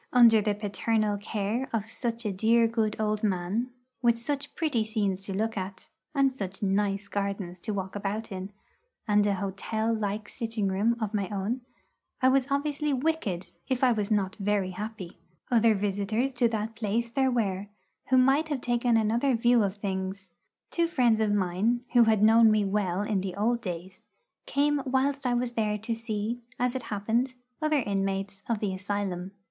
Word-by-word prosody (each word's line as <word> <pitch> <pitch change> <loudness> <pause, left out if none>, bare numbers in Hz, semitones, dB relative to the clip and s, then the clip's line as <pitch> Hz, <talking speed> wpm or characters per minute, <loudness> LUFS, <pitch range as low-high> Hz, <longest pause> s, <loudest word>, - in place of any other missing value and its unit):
Under 230 -3 +7
the 210 0 0
paternal 210 +1 0
care 215 +5 -2
of 220 -3 -1
such 230 +1 -4
a 210 - 0
dear 230 +4 +4
good 225 -2 0
old 215 -1 0
man, 200 +4 0 0.3
with 235 -2 +4
such 280 +4 -4
pretty 295 -9 +1
scenes 205 -4 -1
to 195 - -5
look 220 +3 -1
at, 190 -1 -6 0.3
and 275 -1 +3
such 195 -3 -6
nice 200 0 0
gardens 200 -3 -3
to 215 - -4
walk 190 -1 -4
about 205 +2 -3
in, 190 +1 -5 0.6
and 210 -1 +4
an 200 - +2
hotel 205 +4 -2
like 210 -1 -2
sitting 225 -4 -2
room 210 +5 +1
of 220 -2 -2
my 200 -3 -1
own, 210 +5 -2 0.6
I 260 -2 +5
was 265 0 +3
obviously 290 +1 0
wicked 260 - -1 0.2
if 260 0 0
I 255 - +6
was 210 -3 0
not 200 -3 +1
very 200 -2 0
happy. 205 -2 -7 0.3
Other 230 -2 +5
visitors 205 +6 0
to 245 -1 +3
that 220 0 -2
place 225 +2 -1
there 265 +1 +2
were, 205 -5 -1 0.4
who 260 - +5
might 270 +5 +4
have 290 -5 -2
taken 240 -1 +2
another 235 +4 +2
view 235 +1 +4
of 200 -1 0
things. 190 -1 -4 0.4
Two 340 -1 +2
friends 245 -9 +3
of 215 -1 +2
mine, 205 +5 +1
who 240 -2 +7
had 220 -2 +3
known 225 +1 +7
me 215 -1 +3
well 195 -1 0
in 205 -3 0
old 235 +3 +1
days, 185 -2 -6 0.5
came 290 0 +2
whilst 270 +1 0
I 245 - +2
was 240 0 0
there 215 -3 0
to 220 +2 -3
see, 225 0 -3 0.2
as 250 0 +1
it 260 - -2
happened, 230 +5 0 0.3
other 310 -1 +2
inmates 195 -1 -2
of 225 -3 0
the 200 -3 -1
asylum. 195 -1 -3
215 Hz, 175 wpm, -28 LUFS, 200-240 Hz, 0.6 s, Under